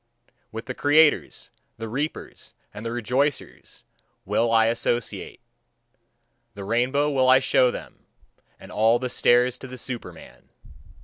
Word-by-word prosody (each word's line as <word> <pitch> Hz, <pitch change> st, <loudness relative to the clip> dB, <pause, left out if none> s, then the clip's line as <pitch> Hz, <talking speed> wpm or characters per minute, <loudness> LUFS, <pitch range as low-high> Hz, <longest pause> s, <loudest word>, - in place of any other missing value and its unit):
With 115 Hz, +2 st, -7 dB
the 130 Hz, -, -5 dB
creators, 150 Hz, +3 st, +2 dB, 0.3 s
the 115 Hz, -, -6 dB
reapers, 140 Hz, +8 st, -6 dB, 0.2 s
and 105 Hz, -, -9 dB
the 115 Hz, -, -4 dB
rejoicers 125 Hz, +5 st, -3 dB, 0.4 s
will 115 Hz, 0 st, 0 dB
I 115 Hz, -1 st, +4 dB
associate: 120 Hz, +1 st, -2 dB, 1.2 s
the 100 Hz, -, -7 dB
rainbow 125 Hz, +7 st, 0 dB
will 130 Hz, -2 st, +2 dB
I 130 Hz, -, +8 dB
show 130 Hz, -1 st, +3 dB
them, -, -, -9 dB, 0.5 s
and -, -, -13 dB
all 110 Hz, +2 st, +3 dB
the 125 Hz, +1 st, -4 dB
stairs 120 Hz, 0 st, +2 dB
to 130 Hz, -, -9 dB
the 130 Hz, 0 st, -9 dB
Superman. 115 Hz, -10 st, -8 dB
125 Hz, 130 wpm, -24 LUFS, 115-130 Hz, 1.2 s, I